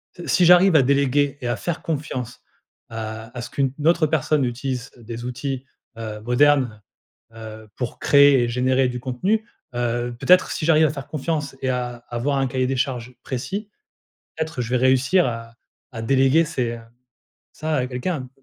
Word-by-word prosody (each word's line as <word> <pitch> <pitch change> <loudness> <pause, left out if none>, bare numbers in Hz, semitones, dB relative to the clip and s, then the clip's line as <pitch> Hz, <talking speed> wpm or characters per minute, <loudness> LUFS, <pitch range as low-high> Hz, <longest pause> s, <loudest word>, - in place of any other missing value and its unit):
s 175 - -9
si 180 - +5
j'arrive 180 +1 +7
à 145 - +7
déléguer 140 +1 +2
et 125 - -3
à 120 - 0
faire 170 - -4
confiance 140 -6 -4 0.5
à 110 0 -6
à - - -3
ce 120 - -7
qu'une 135 -2 0
autre 170 -1 +4
personne 150 -2 +1
utilise 125 0 -3
des 115 0 -8
outils, 130 +1 -4 0.3
heu, 110 -2 -6
modernes, 125 -2 +2 0.5
heu 115 - -14
heu, 110 -1 -10
pour 125 -2 -4
créer 140 -3 +6
et - - 0
générer 130 +1 +2
du 125 0 -5
contenu. 185 - -1 0.3
Heu, 120 0 -1
peut-être 180 +6 +4
si 155 - -3
j'arrive 160 -1 +5
à 145 - +1
faire 140 -2 -7
confiance 150 -2 -3
et 130 - +1
à 125 -1 -2
avoir 130 +4 -1
un 135 - +1
cahier 130 0 -1
des 135 - -1
charges 125 -2 -3
précis, 195 - -4 0.7
peut-être 160 -5 -3
je 115 - -4
vais 125 - +3
réussir 130 +8 +3
à 115 -1 -5 0.4
à 115 -3 -6
déléguer 135 +6 +4
c'est, 125 -7 -2
heu, - - -11 0.7
ça 155 0 -3
à 130 -2 0
quelqu'un, 130 +2 -3
130 Hz, 180 wpm, -22 LUFS, 120-145 Hz, 0.7 s, j'arrive